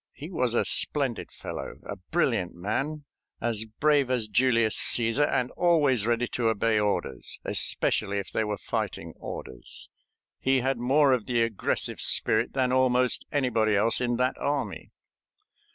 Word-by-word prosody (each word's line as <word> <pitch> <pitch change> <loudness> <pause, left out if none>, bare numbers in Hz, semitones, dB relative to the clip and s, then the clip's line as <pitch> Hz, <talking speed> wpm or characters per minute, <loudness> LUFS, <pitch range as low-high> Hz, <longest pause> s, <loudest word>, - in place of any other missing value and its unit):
He 155 +7 -9
was 125 -8 0
a - - +2
splendid 135 -6 +1
fellow, - - -7
a - - -5
brilliant 90 -2 -1
man, 135 - -3 0.3
as 110 -2 -1
brave 140 +4 +1
as 125 -4 0
Julius 115 0 +2
Cæsar, 120 +5 +3
and 125 -2 0
always 145 - +2
ready 120 +1 +1
to 120 -2 -1
obey 110 0 +1
orders, 105 -1 -2
especially 100 +1 +1
if 100 - -5
they 110 - 0
were 105 -1 -3
fighting - - -4
orders. 60 -2 -7 0.5
He 135 -1 +2
had 130 -1 -1
more 135 +3 +3
of 125 -4 -1
the 120 -2 +2
aggressive 115 -3 -2
spirit 110 +2 +2
than 130 -2 +1
almost 125 -1 +1
anybody 115 -6 +1
else 110 +5 +3
in 120 -1 0
that 125 +1 +1
army. 145 0 -3
120 Hz, 150 wpm, -27 LUFS, 110-135 Hz, 0.5 s, Cæsar